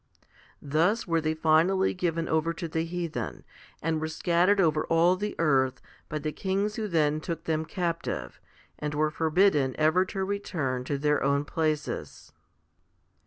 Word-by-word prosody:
2 - - -11
Thus 175 +10 +2
were 165 -2 +1
they 155 0 -1
finally 165 +5 +3
given 170 -3 -1
over 160 +1 +1
to 170 - -5
the 160 0 -2
heathen, 170 -1 -4 0.4
and 160 0 0
were 160 - -1
scattered 175 +5 +2
over 155 -4 +3
all 170 +2 +4
the 210 +3 -4
earth 130 -5 +2 0.3
by 155 - -2
the 155 +1 -3
kings 200 +5 -1
who 220 -1 -2
then 155 -4 +1
took 165 0 -4
them 160 -1 -1
captive, 170 - -3 0.4
and 150 -1 -3
were 155 +1 +1
forbidden 160 -4 +2
ever 160 +4 +4
to 190 0 -3
return 155 -10 -2
to 140 +1 -1
their 150 +1 +1
own 140 +1 +1
places. 155 -1 -3
160 Hz, 160 wpm, -28 LUFS, 150-180 Hz, 0.4 s, all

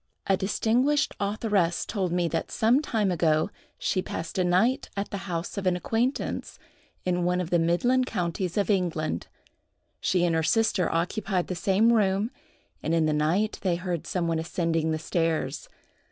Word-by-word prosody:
A 195 - +3
distinguished 235 +9 +1
authoress 200 -4 0
told 190 -5 -2
me 175 -1 +1
that 165 - -2
some 235 +6 +3
time 215 -9 0
ago 160 +1 +2 0.3
she 185 - 0
passed 165 +1 -5
a - - +3
night 185 +9 +2
at 200 - -3
the 195 -1 -5
house 170 +3 -3
of 190 - -2
an 180 - +3
acquaintance, 230 +8 -2 0.5
in 180 -1 +1
one 180 +1 +1
of 180 -2 -3
the 175 - +4
midland 245 +10 +2
counties 180 -2 -2
of 205 +1 +2
England. 165 - -1 0.7
She 180 -1 +2
and 170 - +1
her 160 - +2
sister 210 -1 +2
occupied 180 +2 -1
the 185 - -2
same 200 +6 +3
room, 205 +1 +2 0.5
and 160 +2 0
in 165 -1 +3
the 155 - +1
night 165 +8 +1
they 185 -3 +1
heard 175 -2 -3
some 175 -2 -1
one 165 -1 0
ascending 165 -1 -1
the 155 - 0
stairs. 160 -4 -1
180 Hz, 170 wpm, -27 LUFS, 165-205 Hz, 0.7 s, the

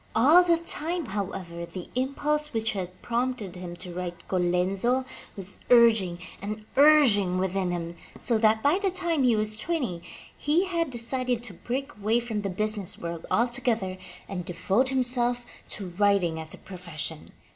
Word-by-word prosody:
All 300 +11 +7
the 340 -1 +3
time, 335 0 -2
however, 190 -5 -5
the 175 +1 -7
impulse 295 +3 0
which 225 0 0
had 185 -2 -5
prompted 240 -5 -2
him 180 -1 -7
to 175 0 -8
write 175 -1 -6
Colenzo 190 +8 +1 0.3
was 195 0 -2
urging 225 -7 +5 0.2
and 215 +2 -5
urging 260 -11 +5
within 190 0 0
him, 170 -1 -4 0.2
so 230 -2 +4
that, 220 0 +3
by 300 +7 +3
the 400 -1 +1
time 345 -4 0
he 245 -3 +4
was 215 0 +1
twenty, 255 - -2 0.3
he 320 +6 +1
had 335 -4 -1
decided 245 0 -1
to 230 -6 -3
break 260 +10 -4
away 215 +3 +1
from 225 -3 -3
the 200 - -3
business 210 0 -1
world 170 -1 -6
altogether 235 -5 +1 0.3
and 180 -2 -4
devote 190 +8 0
himself 245 -2 +1 0.2
to 195 -3 -4
writing 195 -5 +2
as 160 0 -2
a - - -15
profession. 170 -4 -7
215 Hz, 155 wpm, -27 LUFS, 185-260 Hz, 0.3 s, All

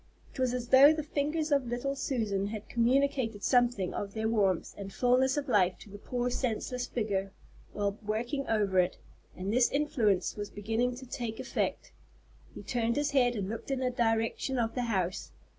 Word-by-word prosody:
It - - -11
was 255 -1 +2
as 245 -1 -4
though 270 +3 +8
the 310 -1 -1
fingers 300 +2 -1
of 280 -3 +2
little 245 +4 -2
Susan 215 -8 -1
had 210 0 -6
communicated 240 -3 +1
something 245 -7 +2
of 200 0 -5
their 220 0 0
warmth 200 -5 +1
and 195 -1 -7
fulness 255 +4 +2
of 290 0 -2
life 190 -7 +3
to 205 - -14
the 205 - -9
poor 245 +3 -2
senseless 250 +1 -2
figure 200 -4 -2 0.4
while 200 0 -2
working 235 +6 -2
over 205 -4 +2
it, 180 0 +1 0.4
and 190 +3 -3
this 245 0 +4
influence 260 - +1
was 205 -1 -5
beginning 225 +4 -1
to 260 +1 -10
take 235 -3 -5
effect. - - -2 0.6
He - - -8
turned 235 -1 0
his 290 0 0
head 245 -3 +3
and 200 -3 -2
looked 225 +6 -6
in 270 - 0
the 255 -1 0
direction 230 +2 0
of 225 -2 0
the 250 -1 -1
house. 185 -4 -2
235 Hz, 185 wpm, -30 LUFS, 205-260 Hz, 0.6 s, though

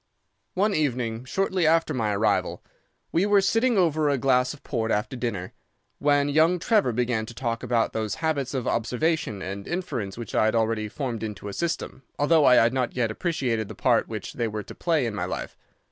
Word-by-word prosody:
"One 205 +3 +2
evening, 125 -6 -1
shortly 190 +1 0
after 165 +1 +3
my 110 -5 0
arrival, 110 +2 0 0.5
we 180 +5 +2
were 205 -1 +5
sitting 225 +4 +2
over 155 -4 +2
a 140 - +2
glass 125 -1 +2
of 150 - -11
port 115 -5 -2
after 105 +4 -1
dinner, 110 -7 -4 0.5
when 145 0 +3
young 160 +5 +3
Trevor 200 - +2
began 120 -2 -1
to 120 - -10
talk 115 -2 -2
about 120 -2 0
those 110 -2 -2
habits 145 -5 -1
of 130 - -2
observation 125 - -1
and 100 +1 -6
inference 140 - -3
which 120 - -7
I - - +3
had 110 - +1
already 110 -1 0
formed 120 -3 -4
into 105 -2 -5
a - - -7
system, 170 -3 -3 0.2
although 150 +1 +4
I 125 - +7
had 115 0 +4
not 130 -2 -1
yet 120 -3 0
appreciated 120 - -1
the - - -9
part - - +2
which - - -6
they 115 - -1
were 105 -1 -4
to - - -10
play 160 -6 0
in 115 - -2
my 105 - -2
life. - - -5
125 Hz, 200 wpm, -25 LUFS, 110-160 Hz, 0.5 s, I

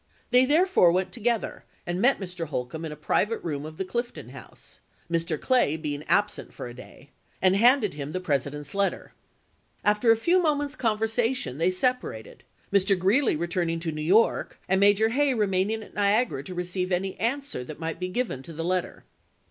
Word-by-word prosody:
They 250 +1 +6
therefore 310 - +4
went 185 +2 0
together 235 -1 -2 0.2
and 175 +2 -2
met 265 +4 +4
Mr. 180 -4 -5
Holcombe 145 +3 -4
in - - -4
July, 150 - -7
is&l 150 - -29
a - - -23
private 225 +2 +1
room 150 -3 -3
of 155 0 -11
the 190 - -2
Clifton 240 +6 -4
House - - -13 0.3
(Mr. 165 -2 0
Clay 245 - +2
be 150 -2 -3
ing 145 +1 -6
absent 205 0 0
for - - -6
a 120 - -9
day), 130 +2 -14 0.3
and 185 0 +3
handed 235 - +4
him 145 0 -6
the 185 - -2
Presi 145 -6 0
dent's 145 -1 -7
letter. 200 0 -1 0.7
After 210 +3 +4
a 225 - +4
few 350 +10 +3
moments' 290 -3 0
conversation 225 - 0
they 170 +2 +3
separated, 185 - -2 0.3
Mr. 195 0 +3
Greeley 205 - +3
returning 170 0 -1
to 165 -1 -2
New 155 0 -5
York 195 +9 +2
and 190 +1 +2
Major 205 +2 +4
Hay 275 +2 +2
remaining 210 +1 0
at - - -15
Niagara 205 - +1
to 185 - -7
receive 180 +1 -2
any 185 +1 -1
answer 275 - -2
that 150 +4 -9
might 165 0 -4
be 180 - -2
given 185 - -2
to 165 +5 -10
the 165 +1 -4
let 185 +1 +2
ter. - - -14
190 Hz, 195 wpm, -26 LUFS, 165-230 Hz, 0.7 s, They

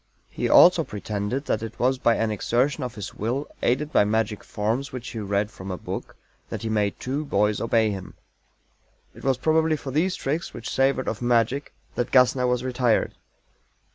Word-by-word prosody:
He - - -2
also - - +7
pretended 105 +6 -4
that - - 0
it 115 0 -7
was 130 +1 +1
by 115 -2 +3
an 115 -1 0
exertion 125 +7 0
of 125 -3 -5
his 105 -2 -6
Will, 125 +7 -2
aided 145 +5 0
by - - +5
magic 105 0 -1
forms 115 +7 -2
which 125 -2 -6
he 115 - -6
read 100 0 -1
from 95 +1 -9
a 90 - -3
book, - - -6 0.3
that - - -5
he 110 - -2
made 105 -2 0
two 140 +4 -2
boys 105 -6 +1
obey 115 -2 +2
him. 95 -2 -7 1.0
It - - -14
was 135 -2 +2
probably 160 +3 +2
for 135 - -6
these 175 +7 +1
tricks 150 +5 -3
which 115 -2 -6
savored 135 0 +1
of 110 - -3
magic 120 +3 +1 0.2
that 120 - -2
GASSNER 125 0 +4
was 125 0 0
"retired." 125 -3 +1
120 Hz, 185 wpm, -25 LUFS, 105-135 Hz, 1.0 s, also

